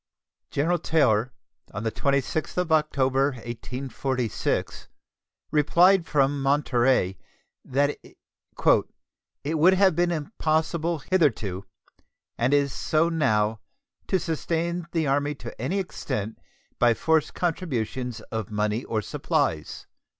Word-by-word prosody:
General 170 +5 +1
Taylor, 130 -8 +2 0.4
on 105 - -3
the 110 - -1
26th 140 +7 -1
of 180 -2 0
October, 140 -3 +2
1846, 125 +1 -3 0.6
replied 170 +4 +4
from 140 -1 +1
Monterey 130 -8 +2 0.4
that 145 +2 0
"it 150 +3 -3
would 180 +5 +6
have 190 -3 +4
been 175 +1 +2
impossible 160 -1 -1
hitherto, 110 - +1 0.7
and 120 +3 +1
is 140 -1 +2
so 160 +2 +1
now, 110 -9 +1 0.5
to 190 - +2
sustain 170 +1 -2
the 165 -2 0
Army 145 +1 0
to 120 -4 -9
any 165 +11 -1
extent 110 - -4 0.4
by 120 -1 +4
forced 160 +3 +1
contributions 125 - -2
of 110 -2 -3
money 105 +2 -1
or 110 -2 -2
supplies." 75 -4 -1
140 Hz, 105 wpm, -25 LUFS, 120-160 Hz, 0.7 s, would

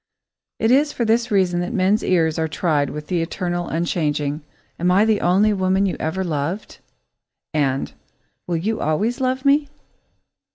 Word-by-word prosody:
It 225 - +1
is 290 +3 +4
for 240 - -2
this 230 +2 +2
reason 185 -4 +2
that 175 +7 -3
men's 195 +2 +2
ears 165 -3 +1
are 160 - 0
tried 155 -3 0
with 150 0 -6
the 175 0 -1
eternal, 175 +1 -3
unchanging: 150 -3 -1 0.4
"Am 175 +1 +1
I 195 +4 +4
the 220 -2 +2
only 195 +5 +3
woman 190 0 +1
you 190 - -1
ever 170 +5 -2
loved?" 165 +4 -3 0.7
and 135 -3 0 0.5
"Will 175 -2 0
you 215 +7 -2
always 210 - 0
love 260 +1 -1
me?" 285 +1 +3
180 Hz, 160 wpm, -21 LUFS, 160-215 Hz, 0.7 s, is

